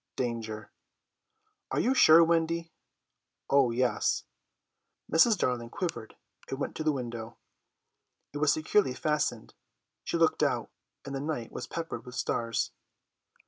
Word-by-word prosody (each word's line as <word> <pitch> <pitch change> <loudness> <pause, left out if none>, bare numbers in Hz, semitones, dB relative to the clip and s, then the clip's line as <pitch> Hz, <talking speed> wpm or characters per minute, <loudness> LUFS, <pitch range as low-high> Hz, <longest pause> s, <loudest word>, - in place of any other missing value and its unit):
Danger! 110 -3 -4 1.0
"Are - - 0
you 255 - +3
sure, 165 -9 +8
Wendy?" 165 0 +1 0.8
"Oh, 140 -2 +5
yes." 120 -2 +1 0.9
Mrs. 210 +8 +5
Darling 120 -2 -1
quivered 165 - -4 0.3
and 135 - -3
went 140 - -4
to 155 - -2
the 155 - +3
window. 115 -4 -5 1.0
It 145 - -4
was 150 -1 +4
securely 155 -1 +2
fastened. 150 -7 -1 0.5
She - - -1
looked - - +2
out, - - 0 0.3
and 140 - -6
the 135 - -2
night 145 -6 -3
was - - -6
peppered 165 -1 -5
with 125 -1 -10
stars. 115 -2 -1
140 Hz, 130 wpm, -29 LUFS, 120-160 Hz, 1.0 s, sure